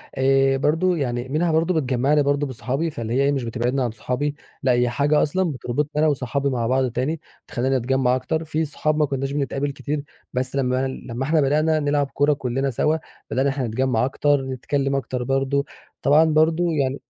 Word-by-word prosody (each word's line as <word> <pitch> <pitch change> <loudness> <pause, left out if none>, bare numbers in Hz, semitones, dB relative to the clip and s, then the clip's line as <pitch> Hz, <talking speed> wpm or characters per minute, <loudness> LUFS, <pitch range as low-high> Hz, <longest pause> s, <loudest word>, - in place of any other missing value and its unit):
آآ 135 0 +3
برضو 165 +6 +2
يعني 125 -4 -2
منها 160 +4 +1
برضه 165 +3 +2
بتجمّعني 140 0 +2
برضه 145 +1 +1
بصحابي، 135 +5 -2
فاللي 115 -5 -4
هي 130 - +2
إيه 140 - +3
مش 135 -3 -1
بتبعدني 125 +3 -1
عن 120 -3 0
صحابي 130 +6 -2 0.3
لأ، 130 - +3
هي 120 0 +2
حاجة 145 +5 +2
أصلًا 180 +3 0
بتربطني 135 +2 -2
أنا 155 - +4
وصحابي 140 -1 0
مع 120 -3 -1
بعض 130 -1 +1
تاني، 145 +6 -2 0.3
تخلّينا 130 +1 0
نتجمع 130 +1 +1
أكتر. 160 +5 -2
في 160 +1 -1
صحاب 155 +1 -1
ما 150 - +3
كنّاش 135 0 -3
بنتقابل 140 0 -1
كتير، 145 +1 -4 0.3
بس 130 +2 -1
لمّا- 130 0 +1 0.2
لمّا 120 +2 -4
إحنا 155 +1 +3
بدأنا 155 +3 +2
نلعب 145 -1 +1
كورة 145 +1 +3
كلنا 135 0 -1
سوا، 150 +5 +1 0.3
بدأنا 130 - +1
إن - - -1
إحنا 135 -4 -2
نتجمّع 125 +1 +1
أكتر، 145 +1 +1
نتكلم 135 +1 -2
أكتر 130 -2 -2
برضه 135 +2 0 0.4
طبعًا 150 +3 +5
برضه 160 +2 +3
يعني 135 -2 0
135 Hz, 190 wpm, -22 LUFS, 130-150 Hz, 0.4 s, طبعًا